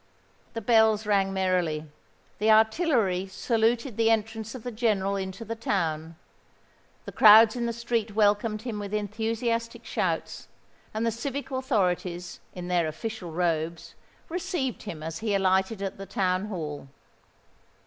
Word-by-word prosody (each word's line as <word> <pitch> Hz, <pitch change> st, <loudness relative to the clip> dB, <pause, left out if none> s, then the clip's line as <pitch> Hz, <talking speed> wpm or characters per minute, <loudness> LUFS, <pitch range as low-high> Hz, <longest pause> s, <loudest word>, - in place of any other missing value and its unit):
The 225 Hz, -, -4 dB
bells 220 Hz, -1 st, +4 dB
rang 195 Hz, -2 st, +2 dB
merrily; 180 Hz, -5 st, 0 dB, 0.5 s
the 215 Hz, +2 st, +2 dB
artillery 220 Hz, -, +3 dB
saluted 230 Hz, +3 st, 0 dB
the 225 Hz, 0 st, +3 dB
entrance 225 Hz, +1 st, -1 dB
of 245 Hz, -, -8 dB
the 245 Hz, -, -4 dB
General 210 Hz, -4 st, 0 dB
into 190 Hz, +3 st, -5 dB
the 225 Hz, -, -3 dB
town; 165 Hz, -7 st, -2 dB, 0.9 s
the -, -, -6 dB
crowds 220 Hz, +1 st, +8 dB
in 240 Hz, -1 st, -1 dB
the -, -, 0 dB
streets 230 Hz, -1 st, -2 dB
welcomed 210 Hz, +1 st, +1 dB
him 225 Hz, -4 st, -4 dB
with 205 Hz, 0 st, -4 dB
enthusiastic 230 Hz, +2 st, -2 dB
shouts; -, -, -2 dB, 0.4 s
and 220 Hz, +2 st, -2 dB
the 230 Hz, -, +2 dB
civic 275 Hz, +5 st, -5 dB
authorities, 180 Hz, -9 st, -1 dB, 0.2 s
in 180 Hz, -1 st, -6 dB
their 175 Hz, -2 st, +1 dB
official 185 Hz, +2 st, -5 dB
robes, 165 Hz, 0 st, -2 dB, 0.3 s
received 340 Hz, -, -3 dB
him 165 Hz, -7 st, -7 dB
as 160 Hz, 0 st, -5 dB
he 215 Hz, -2 st, 0 dB
alighted 190 Hz, +2 st, +1 dB
at 195 Hz, 0 st, -4 dB
the 195 Hz, -, -7 dB
Town 185 Hz, 0 st, 0 dB
Hall. 155 Hz, -8 st, -5 dB
210 Hz, 140 wpm, -27 LUFS, 185-230 Hz, 0.9 s, crowds